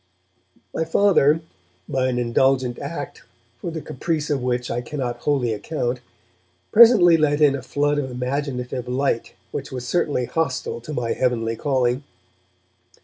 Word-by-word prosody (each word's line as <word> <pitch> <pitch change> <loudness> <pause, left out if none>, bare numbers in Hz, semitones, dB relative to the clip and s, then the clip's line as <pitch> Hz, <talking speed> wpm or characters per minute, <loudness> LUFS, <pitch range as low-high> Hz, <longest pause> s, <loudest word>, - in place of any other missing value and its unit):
My - - 0
Father, 165 -3 +3 0.5
by 130 -1 0
an 125 -1 -1
indulgent 125 +1 +1
act - - -6 0.4
for 170 - -4
the 160 -1 -5
caprice 155 +2 -2
of 140 -3 0
which 125 -1 -1
I 120 - -1
cannot 125 -2 -4
wholly 130 -4 0
account, 125 +1 -3 0.7
presently 210 -7 +7
let 150 -1 +2
in 145 -2 +5
a 140 - -3
flood 145 +3 0
of 130 -2 -3
imaginative 125 -1 -3
light 125 -1 -1 0.2
which - - -5
was 125 -1 -5
certainly 145 -5 0
hostile 130 -6 -2
to 150 +6 -7
my 120 -4 -1
heavenly 115 -3 0
calling. 130 0 0
130 Hz, 145 wpm, -22 LUFS, 125-150 Hz, 0.7 s, presently